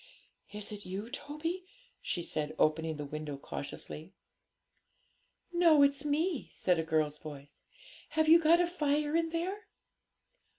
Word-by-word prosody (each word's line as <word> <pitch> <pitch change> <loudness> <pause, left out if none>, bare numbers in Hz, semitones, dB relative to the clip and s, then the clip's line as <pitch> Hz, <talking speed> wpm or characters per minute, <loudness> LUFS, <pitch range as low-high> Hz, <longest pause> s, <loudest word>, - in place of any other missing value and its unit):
'Is 210 +1 -2
it 205 -1 -7
you, 200 +5 -5
Toby?' 305 +5 -4 0.4
she 175 - -2
said, 155 -1 -1
opening 160 0 +1
the 150 - -4
window 150 0 -5
cautiously. 155 +5 -7 1.4
'No, 335 -4 +6
it's 280 0 +3
me,' 300 +1 0
said 180 -3 +1
a - - +1
girl's 155 -2 0
voice. 145 -2 -9 0.6
'Have 315 +1 +1
you 330 +2 +9
got 335 +1 +5
a 350 - +4
fire 300 -3 0
in 330 0 +2
there?' 370 +6 -3
280 Hz, 135 wpm, -32 LUFS, -, 1.4 s, you